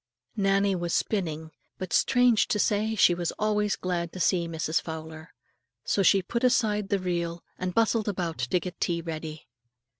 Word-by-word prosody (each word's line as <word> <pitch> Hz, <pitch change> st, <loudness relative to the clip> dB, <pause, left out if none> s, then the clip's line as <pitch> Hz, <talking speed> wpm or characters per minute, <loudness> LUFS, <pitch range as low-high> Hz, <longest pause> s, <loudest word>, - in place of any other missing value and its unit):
Nannie 195 Hz, -1 st, +2 dB
was 175 Hz, -2 st, -1 dB
spinning, 160 Hz, -6 st, -2 dB, 0.3 s
but 185 Hz, -2 st, -5 dB
strange 245 Hz, -3 st, +4 dB
to -, -, 0 dB
say, 215 Hz, +2 st, +1 dB
she 180 Hz, -, +5 dB
was 175 Hz, -1 st, -2 dB
always 210 Hz, -1 st, 0 dB
glad 170 Hz, -2 st, -3 dB
to 185 Hz, -, -7 dB
see 175 Hz, -1 st, +2 dB
Mrs. 160 Hz, -1 st, -1 dB
Fowler. 160 Hz, 0 st, -8 dB, 0.5 s
So 200 Hz, -, +1 dB
she 195 Hz, 0 st, +4 dB
put 235 Hz, +7 st, -3 dB
aside 215 Hz, -5 st, +2 dB
the 200 Hz, -, +2 dB
reel 170 Hz, -2 st, -3 dB, 0.2 s
and 185 Hz, -1 st, -3 dB
bustled 225 Hz, -1 st, +2 dB
about 175 Hz, -6 st, -2 dB
to 125 Hz, +8 st, +1 dB
get 180 Hz, 0 st, -8 dB
tea 170 Hz, -2 st, 0 dB
ready. 160 Hz, -2 st, -6 dB
185 Hz, 170 wpm, -27 LUFS, 170-210 Hz, 0.5 s, she